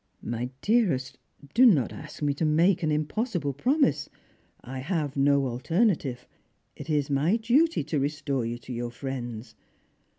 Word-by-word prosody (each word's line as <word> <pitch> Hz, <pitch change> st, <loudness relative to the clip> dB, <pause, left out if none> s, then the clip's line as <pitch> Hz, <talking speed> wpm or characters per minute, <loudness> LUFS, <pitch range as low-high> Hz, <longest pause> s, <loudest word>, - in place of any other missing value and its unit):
" -, -, -43 dB
My 120 Hz, +2 st, -3 dB
dearest, 140 Hz, -, +1 dB, 0.3 s
do 250 Hz, -, +5 dB
not 165 Hz, -, +5 dB
ask 150 Hz, 0 st, -9 dB
me 145 Hz, -1 st, +2 dB
to 145 Hz, -, -3 dB
make 165 Hz, +4 st, +3 dB
an 155 Hz, -2 st, 0 dB
impossible 155 Hz, -, -1 dB
promise. 270 Hz, -, +1 dB, 0.5 s
I 130 Hz, +2 st, -7 dB
have 150 Hz, -1 st, -2 dB
no 140 Hz, 0 st, +3 dB
alternative. 135 Hz, -, 0 dB, 0.5 s
It 145 Hz, -, -9 dB
is 145 Hz, -2 st, 0 dB
my 150 Hz, +9 st, +2 dB
duty 245 Hz, -, +2 dB
to 155 Hz, 0 st, -1 dB
restore 140 Hz, -2 st, -1 dB
you 115 Hz, +1 st, -3 dB
to 120 Hz, +1 st, -9 dB
your 120 Hz, 0 st, -3 dB
friends. 120 Hz, -3 st, -6 dB
145 Hz, 155 wpm, -27 LUFS, 130-175 Hz, 0.5 s, do